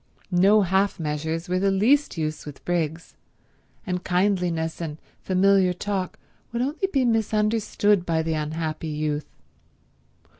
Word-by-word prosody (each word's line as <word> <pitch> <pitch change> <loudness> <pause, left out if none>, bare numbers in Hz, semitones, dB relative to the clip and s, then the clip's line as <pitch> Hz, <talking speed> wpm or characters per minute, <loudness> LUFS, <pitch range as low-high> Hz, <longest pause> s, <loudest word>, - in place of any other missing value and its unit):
No 200 +4 +5
half 190 +2 +1
measures 160 +2 -3
were 180 +1 0
the 195 +1 +2
least 230 +7 +2
use 155 -1 -3
with 145 -2 -11
Briggs, 165 -2 -2 0.7
and 180 -1 -2
kindliness 180 -4 0
and 155 -2 -4 0.2
familiar 190 0 +3
talk 190 0 -3 0.3
would 235 +1 -1
only 305 +8 -1
be 270 -3 +2
misunderstood 215 -3 +2
by 165 -2 0
the 165 0 -1
unhappy 155 +1 -3
youth. 150 -1 -2
180 Hz, 125 wpm, -24 LUFS, 160-205 Hz, 0.7 s, No